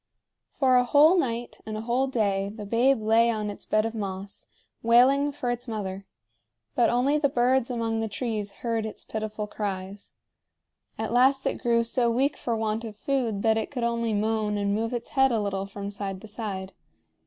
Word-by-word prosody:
For 260 -2 +3
a 250 - +5
whole 295 +7 +6
night 240 -8 -2
and 215 0 -5
a - - -4
whole 245 +4 0
day 200 -6 0
the 210 0 -8
babe 235 +3 +2
lay 225 +2 +4
on 215 -2 -1
its 205 - -9
bed 215 0 +2
of 225 - -3
moss, 195 -2 -5 0.3
wailing 260 +5 +4
for 250 -4 -2
its 245 +1 -4
mother; 195 -3 -5 0.7
but 235 - +3
only 265 +5 +2
the 285 -1 +2
birds 255 0 +2
among 230 -2 -1
the 225 - -1
trees 215 -2 -3
heard 230 -1 0
its 220 - -6
pitiful 215 -1 -4
cries. 200 -1 -5 0.8
At 220 +1 -3
last 265 +2 +4
it - - -1
grew 235 -2 +2
so 235 +1 +2
weak 265 +5 +1
for 235 - -2
want 220 +1 -1
of 220 -2 -7
food 230 -4 -1
that 220 -1 +3
it 220 - -2
could 250 -4 -4
only 235 -1 0
moan 215 0 0
and 200 0 0
move 225 +2 -1
its 240 -2 -4
head 265 -1 +3
a 230 - +1
little 195 -1 -2
from 200 0 -6
side 195 -2 -4
to 220 - -10
side. 200 -3 -5
225 Hz, 195 wpm, -26 LUFS, 210-245 Hz, 0.8 s, whole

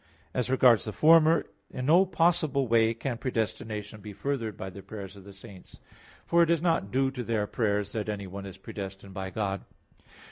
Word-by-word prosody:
As 125 -1 -1
regards 125 -3 +5
the 110 - -3
former, 160 +1 +5 0.2
in 125 - -5
no 175 +6 +5
possible 160 -6 +2
way 115 0 +4
can 120 0 -4
predestination 110 -3 -3
be 105 -1 -8
furthered 115 -3 -3
by 95 - -6
the 100 - -10
prayers 100 -2 -9
of 100 -1 -14
the 100 - -11
saints. 100 -1 -14 0.5
For 170 0 +3
it 170 - +4
is 170 -1 +3
not 165 - +1
due 135 +1 +1
to 125 -2 -5
their 110 -3 0
prayers 105 -2 -1
that 110 -1 -3
anyone 100 -1 -5
is 95 0 -10
predestined 95 0 -8
by 95 -1 -4
God. 100 -1 -2
110 Hz, 185 wpm, -28 LUFS, 100-135 Hz, 0.5 s, regards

